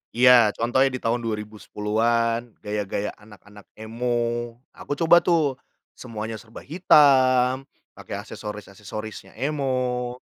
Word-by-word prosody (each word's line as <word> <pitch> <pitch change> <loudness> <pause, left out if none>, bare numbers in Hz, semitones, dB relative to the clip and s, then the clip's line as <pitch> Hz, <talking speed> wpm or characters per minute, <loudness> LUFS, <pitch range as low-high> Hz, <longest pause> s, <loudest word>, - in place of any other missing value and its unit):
iya 125 -2 +7
contohnya 130 +4 +2
di 130 - -4
tahun 120 0 -1
2010-an 115 +2 -2
gaya-gaya 105 0 -3
anak-anak 105 -1 -16
emo. 120 +1 -2 0.2
Aku 145 - -6
coba 170 +2 +5
tuh 150 -7 +1 0.3
semuanya 110 -2 -7
serba 115 -1 -13
hitam, 135 -5 +4 0.2
pakai - - -7
aksesoris-aksesorisnya 105 +1 -8
emo. 130 -3 -2
120 Hz, 100 wpm, -24 LUFS, 110-130 Hz, 0.3 s, iya